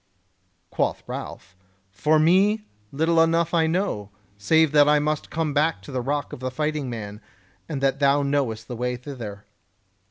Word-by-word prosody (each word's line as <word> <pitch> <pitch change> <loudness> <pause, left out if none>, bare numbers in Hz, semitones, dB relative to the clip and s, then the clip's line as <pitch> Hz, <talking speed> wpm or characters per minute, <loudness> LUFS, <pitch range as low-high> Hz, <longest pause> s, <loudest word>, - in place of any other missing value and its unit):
Quoth - - -1
Ralph: 90 +1 -8 0.4
"For 150 +11 +2
me, 195 +7 +3 0.3
little 165 +3 +2
enough 165 +1 +2
I 165 -1 +3
know, 160 - -1 0.3
save 155 +10 +3
that 145 -1 +5
I 150 - +5
must 150 +1 -1
come 155 -2 -2
to 150 0 0
the 130 -1 -2
Rock 145 +2 -2
of - - -7
the 130 0 -3
Fighting 150 +1 -2
Man, 105 -2 -7 0.5
and 145 -4 -3
that 135 0 +1
thou 140 0 +3
knowest 135 -6 -1
the 120 - -5
way 125 +1 -2
thither." 120 -6 -8
145 Hz, 160 wpm, -24 LUFS, 125-160 Hz, 0.5 s, that